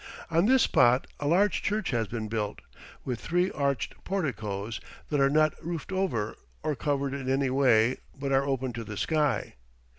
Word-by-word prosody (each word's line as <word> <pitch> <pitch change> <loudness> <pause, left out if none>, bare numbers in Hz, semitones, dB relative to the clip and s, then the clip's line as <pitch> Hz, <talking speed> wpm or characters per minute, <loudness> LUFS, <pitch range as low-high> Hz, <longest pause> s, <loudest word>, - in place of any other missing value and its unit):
On 165 +5 +3
this 260 0 +5
spot 125 -4 +4
a 145 - -2
large 195 +6 +3
church 210 -4 -1
has 115 -3 0
been 110 0 -4
built, 105 -2 -3 0.4
with 125 -3 -2
three 180 +2 +1
arched 140 -2 -2
porticoes 110 - -3 0.3
that 145 - +2
are 135 0 +5
not 155 +1 +3
roofed 170 +1 -4
over 180 - -1 0.3
or 155 -1 0
covered 140 -1 -1
in 135 -2 -4
any 135 0 +1
way, 125 -3 +4 0.2
but 140 0 -3
are 135 0 +4
open 130 -2 -1
to 115 0 -5
the 105 -1 -7
sky. 150 0 0
135 Hz, 175 wpm, -28 LUFS, 120-155 Hz, 0.4 s, this